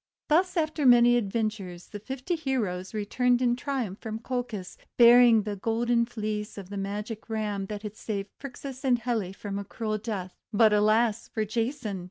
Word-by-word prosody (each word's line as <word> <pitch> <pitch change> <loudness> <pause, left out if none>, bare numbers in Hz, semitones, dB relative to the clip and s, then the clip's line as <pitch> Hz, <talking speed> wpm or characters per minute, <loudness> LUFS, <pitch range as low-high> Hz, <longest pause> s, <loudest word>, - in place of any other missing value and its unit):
Thus 360 +4 +3
after 310 -2 0
many 240 -1 +7
adventures 205 -5 -2
the 205 - -7
fifty 265 - -4
heroes 220 - -2
returned 245 +4 +1
in 245 -1 +2
triumph 250 -7 -3
from 220 -1 -5
Colchis, 235 -6 -4 0.2
bearing 235 -2 +7
the 210 -1 -3
Golden 235 +3 +1
Fleece 215 -2 -4
of 195 -1 -9
the - - -5
Magic 210 +3 -5
Ram 210 -3 -2
that 210 0 -6
had 210 0 -6
saved 200 -3 -4
Phrixus 270 -1 -8
and 255 -2 +3
Helle 230 -5 -2
from 200 0 -5
a - - -4
cruel 215 +1 -3
death. 200 -5 -4 0.2
But, 215 0 +5
alas 215 +1 +2
for 220 - -2
Jason! 225 -1 -2
220 Hz, 170 wpm, -27 LUFS, 205-245 Hz, 0.2 s, many